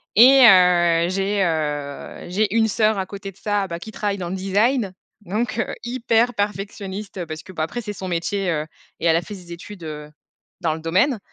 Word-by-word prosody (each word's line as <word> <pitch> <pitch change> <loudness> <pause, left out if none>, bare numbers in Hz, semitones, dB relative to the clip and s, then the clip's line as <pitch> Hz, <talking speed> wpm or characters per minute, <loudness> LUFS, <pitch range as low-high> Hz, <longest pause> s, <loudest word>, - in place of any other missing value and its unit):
Et 265 +5 +8
heu, 175 -3 +5
j'ai, 195 +1 0
heu, 150 -4 -3
j'ai 205 +3 0
une 225 -1 +4
sœur 215 0 +2
à 190 - -1
côté 195 0 -8
de 190 - -26
ça, 205 -2 -1
bah, 170 -1 -5
qui 220 +5 -9
travaille 205 -2 -2
dans 175 -3 -4
le 190 - -3
design, 200 +3 +1 0.3
donc, 215 +4 -2
heu, - - -1
hyper 240 0 +1
perfectionniste 200 -1 -4
parce 155 -1 -7
que, 190 - -12
bah, 160 -4 -2
après 240 +10 -4
c'est 210 -1 -5
son 190 -1 -6
métier, 180 +2 -1
heu 155 -2 -1 0.3
et - - -4
elle 160 - +5
a 170 - +2
fait 205 +4 -8
ses 175 -2 -13
études, 175 +1 -9
heu, 150 -1 -7 0.5
dans 160 -2 +1
le 160 - -6
domaine, 190 - +1
195 Hz, 205 wpm, -22 LUFS, 170-210 Hz, 0.5 s, Et